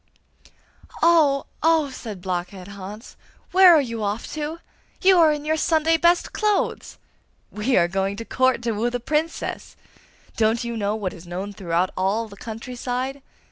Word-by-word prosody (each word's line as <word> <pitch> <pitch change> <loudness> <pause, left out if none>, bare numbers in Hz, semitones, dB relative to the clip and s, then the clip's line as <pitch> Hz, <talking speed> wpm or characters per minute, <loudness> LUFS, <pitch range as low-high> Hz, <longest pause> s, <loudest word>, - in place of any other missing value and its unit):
'Oh, 310 -5 +4 0.2
oh!' 320 -3 +3
said 215 -8 -8
Blockhead 185 +1 -4
Hans. 200 +4 -9 0.4
'Where 370 -2 +8
are 305 - +5
you 230 -4 -5
off 205 +2 -2
to? 305 +1 -4 0.4
You 375 -1 +5
are 320 -2 +6
in 295 0 -3
your 315 +1 +1
Sunday 320 0 +2
best 345 +2 +2
clothes!' 425 -2 -1 0.5
'We 230 +5 0
are 170 - +4
going 195 +2 -1
to 230 +2 -7
Court, 255 -1 +1
to 235 - 0
woo 225 +3 0
the 245 0 -3
Princess! 305 +6 -3 0.6
Don't 225 +1 +1
you 235 0 -4
know 210 -1 -1
what 200 -4 -3
is 175 0 -13
known 190 +4 -5
throughout 180 -1 -1
all 200 +5 0
the 200 - -13
country 225 +4 -8
side? 255 +3 -3
235 Hz, 165 wpm, -23 LUFS, 200-300 Hz, 0.6 s, Where